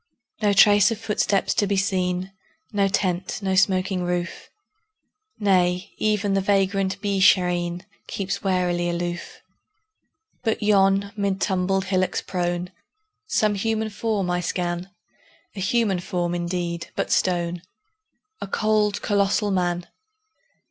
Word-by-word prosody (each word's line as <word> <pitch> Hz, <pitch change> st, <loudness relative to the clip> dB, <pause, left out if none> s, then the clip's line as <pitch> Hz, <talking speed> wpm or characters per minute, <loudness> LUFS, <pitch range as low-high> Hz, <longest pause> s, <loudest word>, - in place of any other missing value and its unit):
No 205 Hz, -1 st, +3 dB
trace 205 Hz, 0 st, +6 dB
of 225 Hz, -, -2 dB
footsteps 210 Hz, -2 st, 0 dB
to 205 Hz, -, +1 dB
be 200 Hz, 0 st, 0 dB
seen, 185 Hz, -1 st, -1 dB, 0.4 s
No 200 Hz, -1 st, +2 dB
tent, 185 Hz, -1 st, -1 dB
no 190 Hz, -1 st, 0 dB
smoking 190 Hz, 0 st, +2 dB
roof; 175 Hz, -1 st, -3 dB, 0.9 s
Nay, 185 Hz, -1 st, +2 dB
even 210 Hz, -2 st, +1 dB
the 195 Hz, -, +2 dB
vagrant 195 Hz, -1 st, +1 dB
Beeshareen 180 Hz, -3 st, +2 dB, 0.2 s
Keeps 195 Hz, -1 st, -3 dB
warily 180 Hz, -2 st, 0 dB
aloof. 175 Hz, 0 st, -4 dB, 1.0 s
But 225 Hz, -2 st, -1 dB
yon, 200 Hz, -1 st, +3 dB
mid 200 Hz, -2 st, -1 dB
tumbled 190 Hz, 0 st, 0 dB
hillocks 185 Hz, -1 st, 0 dB
prone, 175 Hz, -1 st, -2 dB, 0.6 s
Some 210 Hz, -1 st, +2 dB
human 220 Hz, +2 st, -1 dB
form 205 Hz, -4 st, -1 dB
I 180 Hz, -, 0 dB
scan 175 Hz, +1 st, -3 dB, 0.7 s
A -, -, -6 dB
human 195 Hz, -1 st, +1 dB
form, 175 Hz, -1 st, -2 dB
indeed, 175 Hz, -1 st, -3 dB
but -, -, -2 dB
stone: 175 Hz, -1 st, 0 dB, 0.8 s
A -, -, -4 dB
cold, 210 Hz, 0 st, +1 dB
colossal 205 Hz, 0 st, +1 dB
Man! 175 Hz, -2 st, 0 dB
190 Hz, 120 wpm, -23 LUFS, 180-200 Hz, 1.0 s, trace